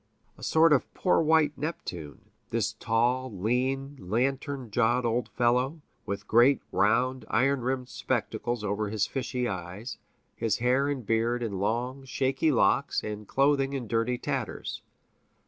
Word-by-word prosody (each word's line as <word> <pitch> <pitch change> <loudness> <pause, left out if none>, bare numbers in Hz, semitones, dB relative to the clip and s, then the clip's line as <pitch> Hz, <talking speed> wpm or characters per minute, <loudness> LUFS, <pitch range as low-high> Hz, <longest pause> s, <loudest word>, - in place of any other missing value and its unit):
A - - -18
sort 160 0 +4
of 140 - +1
poor 180 - +3
white 155 -2 +3
Neptune, 90 - -6 0.2
this - - 0
tall, 125 +3 0
lean, 130 +7 -1
lantern 130 +5 -2
jawed 120 +2 +2
old 115 0 0
fellow, 125 +6 +1 0.3
with 100 0 -4
great 120 +4 +5
round, 125 +5 +2
iron 135 +4 +2
rimmed 130 +1 -2
spectacles 120 -2 -2
over 105 +1 -1
his 105 -2 0
fishy 125 -2 -2
eyes, 95 +4 -6 0.4
his 115 -3 0
hair 130 +4 +2
and 135 -5 -3
beard 115 +3 +1
in 100 -5 -3
long, 125 +6 -2
snaky 135 +4 +1
locks, 140 +1 +2
and 105 -1 -6
clothing 140 0 +2
in 130 -4 -3
dirty 115 +2 0
tatters. 135 -5 -4
125 Hz, 140 wpm, -28 LUFS, 110-135 Hz, 0.4 s, great